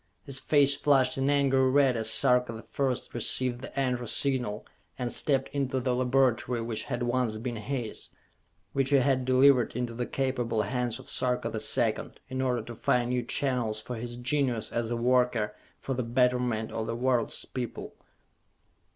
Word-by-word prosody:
His 135 Hz, -2 st, -3 dB
face 140 Hz, -1 st, +4 dB
flushed 135 Hz, -3 st, +3 dB
an 135 Hz, +1 st, +1 dB
angry 135 Hz, -2 st, +3 dB
red 135 Hz, -1 st, +4 dB
as 110 Hz, -1 st, +1 dB
Sarka 125 Hz, +1 st, +4 dB
the 110 Hz, -1 st, -9 dB
First 130 Hz, +2 st, -2 dB
received 120 Hz, +1 st, 0 dB
the 140 Hz, -, -6 dB
"Enter" 125 Hz, -2 st, -1 dB
Signal 125 Hz, -5 st, -1 dB, 0.3 s
and 125 Hz, -2 st, -2 dB
stepped 135 Hz, -2 st, 0 dB
into 135 Hz, -2 st, -1 dB
the 125 Hz, 0 st, 0 dB
laboratory 125 Hz, -1 st, +1 dB
which 115 Hz, -1 st, -3 dB
had 120 Hz, -2 st, -3 dB
once 120 Hz, -2 st, 0 dB
been 120 Hz, +2 st, -4 dB
his 120 Hz, 0 st, -5 dB, 0.6 s
which 135 Hz, -1 st, +1 dB
he 145 Hz, -, +4 dB
had 130 Hz, -1 st, +2 dB
delivered 130 Hz, -1 st, +4 dB
into 120 Hz, -1 st, -2 dB
the 120 Hz, +1 st, -3 dB
capable 125 Hz, -5 st, -1 dB
hands 120 Hz, +1 st, -2 dB
of 130 Hz, -, -13 dB
Sarka 125 Hz, -1 st, 0 dB
the -, -, -3 dB
Second, -, -, 0 dB
in 130 Hz, 0 st, -3 dB
order 125 Hz, -3 st, 0 dB
to 120 Hz, -, -8 dB
find 120 Hz, +2 st, 0 dB
new 125 Hz, 0 st, +1 dB
channels 120 Hz, -3 st, -1 dB
for 120 Hz, +3 st, -6 dB
his 120 Hz, +1 st, -6 dB
genius, 125 Hz, -2 st, -1 dB
as 115 Hz, -1 st, -2 dB
a 120 Hz, -, -1 dB
worker 125 Hz, -3 st, +1 dB, 0.3 s
for 135 Hz, -, -3 dB
the 125 Hz, -, -2 dB
betterment 125 Hz, -2 st, 0 dB
of 110 Hz, 0 st, -3 dB
the 115 Hz, -, -2 dB
world's 125 Hz, -1 st, 0 dB
people. 125 Hz, -2 st, -6 dB
125 Hz, 175 wpm, -28 LUFS, 120-130 Hz, 0.6 s, face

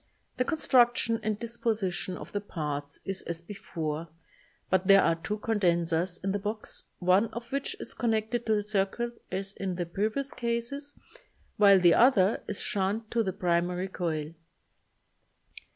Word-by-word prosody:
The 255 Hz, -, +1 dB
con 320 Hz, -, -1 dB
struction 240 Hz, -5 st, +3 dB
and 215 Hz, -1 st, -1 dB
disposition 215 Hz, -5 st, -2 dB
of -, -, -9 dB
the 205 Hz, -, -2 dB
parts 145 Hz, -6 st, -4 dB
is 195 Hz, -1 st, -3 dB
as 170 Hz, -1 st, -3 dB
before 165 Hz, -3 st, -5 dB, 0.6 s
but 185 Hz, 0 st, +2 dB
there 195 Hz, -1 st, +8 dB
are 165 Hz, -, +4 dB
two 185 Hz, +6 st, -4 dB
condensers 175 Hz, -5 st, +1 dB
in 195 Hz, -, 0 dB
the 205 Hz, -, -1 dB
box, 210 Hz, +2 st, -5 dB
one 185 Hz, +5 st, +3 dB
of 235 Hz, +1 st, -8 dB
which 275 Hz, 0 st, -2 dB
is -, -, -6 dB
connected 225 Hz, 0 st, -1 dB
in 220 Hz, -, +5 dB
the 210 Hz, -, 0 dB
cir 200 Hz, -2 st, +1 dB
cuit 235 Hz, +3 st, -5 dB
as 195 Hz, +1 st, -3 dB
in 190 Hz, -2 st, -3 dB
the 175 Hz, 0 st, -2 dB
previous 215 Hz, +10 st, -2 dB
cases, 240 Hz, +5 st, -3 dB, 0.6 s
while 200 Hz, -2 st, +7 dB
the 175 Hz, -2 st, +6 dB
other 225 Hz, -4 st, +4 dB
is 205 Hz, -, -3 dB
in -, -, -2 dB
shunt 205 Hz, +3 st, -1 dB
to 235 Hz, -, +2 dB
the 195 Hz, -4 st, 0 dB
primary 180 Hz, +2 st, 0 dB
coil. 160 Hz, -4 st, -3 dB
200 Hz, 165 wpm, -29 LUFS, 180-230 Hz, 0.6 s, there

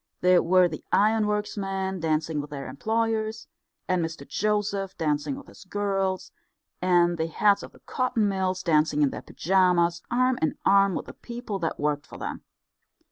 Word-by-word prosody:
There 180 Hz, -1 st, +5 dB
were 180 Hz, +1 st, +4 dB
the 155 Hz, -2 st, -7 dB
ironworks 210 Hz, 0 st, +2 dB
men 190 Hz, -1 st, -2 dB
dancing 155 Hz, -1 st, 0 dB
with 145 Hz, -, -9 dB
their 140 Hz, -2 st, -6 dB
employers, 220 Hz, -, -1 dB, 0.4 s
and 185 Hz, -2 st, +1 dB
Mr 160 Hz, -3 st, -6 dB
Joseph 205 Hz, -2 st, -1 dB
dancing 150 Hz, -, -1 dB
with 280 Hz, -, -10 dB
his -, -, -15 dB
girls, 195 Hz, -1 st, -2 dB, 0.5 s
and 175 Hz, -2 st, +3 dB
the 160 Hz, -, 0 dB
heads 200 Hz, +5 st, +3 dB
of -, -, -9 dB
the -, -, -20 dB
cotton 250 Hz, -4 st, 0 dB
mills 185 Hz, -1 st, -1 dB
dancing 155 Hz, -3 st, +3 dB
in 140 Hz, -, +2 dB
their -, -, -6 dB
pyjamas, 175 Hz, -1 st, +2 dB
arm 255 Hz, +1 st, +2 dB
in 160 Hz, -, 0 dB
arm 195 Hz, -1 st, +5 dB
with -, -, -3 dB
the -, -, -10 dB
people 235 Hz, -4 st, -6 dB
that 165 Hz, -2 st, -2 dB
worked 145 Hz, -1 st, -1 dB
for -, -, -10 dB
them. -, -, -5 dB
185 Hz, 170 wpm, -26 LUFS, 165-210 Hz, 0.5 s, There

